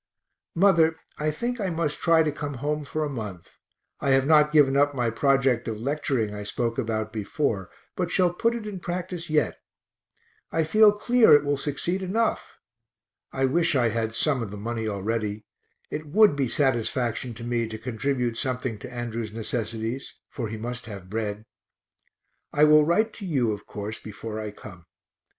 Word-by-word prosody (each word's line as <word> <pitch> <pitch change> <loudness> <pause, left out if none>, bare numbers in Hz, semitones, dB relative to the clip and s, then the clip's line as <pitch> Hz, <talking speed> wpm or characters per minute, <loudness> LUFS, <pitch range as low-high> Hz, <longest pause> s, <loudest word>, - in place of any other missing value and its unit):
Mother, 165 -3 +4 0.2
I 155 +1 +1
think 240 +10 -3
I 195 - 0
must 160 -3 -1
try 165 -1 +4
to 155 - 0
come 145 -1 -5
home 150 +3 -2
for 155 +2 -2
a - - -1
month 105 - -6 0.5
I 140 - -1
have 135 - +1
not 150 0 +5
given 145 -3 +5
up 145 0 +3
my 120 -3 0
project 130 0 +2
of 110 -2 -3
lecturing 135 -4 -1
I 105 - -5
spoke 115 +4 -2
about 110 -2 -2
before, 105 - -2 0.3
but 180 -2 -1
shall 180 -1 +2
put 230 +6 +1
it 230 -2 -5
in 205 -3 -5
practice 175 -1 -4
yet; 150 -6 +1 0.9
I 165 - +1
feel 215 +7 +6
clear 225 -2 +5
it 145 - +4
will 145 0 +1
succeed 150 +7 -2
enough. 215 +5 -1 0.7
(I 135 0 +1
wish 165 +3 +2
I 120 -3 +3
had 115 0 -2
some 140 -2 +1
of 115 - -4
the 105 - -7
money 115 +1 -3
already; 105 +1 -2 0.5
it 155 0 -4
would 205 +1 +5
be 140 -2 0
satisfaction 120 -2 0
to 115 - -9
me 120 -1 -1
to 110 0 -6
contribute 125 +1 -2
something 125 -4 -2
to 120 - -9
Andrew's 115 -2 -4
necessities, 115 +2 -4
for 120 -4 -4
he 110 +1 -5
must 120 +2 -5
have 100 -4 -9
bread.) 105 -1 -3 1.1
I 145 - +3
will 150 0 +7
write 215 +6 +2
to 205 - -8
you, 130 -9 +1
of 105 0 -9
course, 105 +1 -6
before 110 +1 -6
I 110 -1 -4
come. 90 -4 -12
130 Hz, 175 wpm, -26 LUFS, 110-155 Hz, 1.1 s, will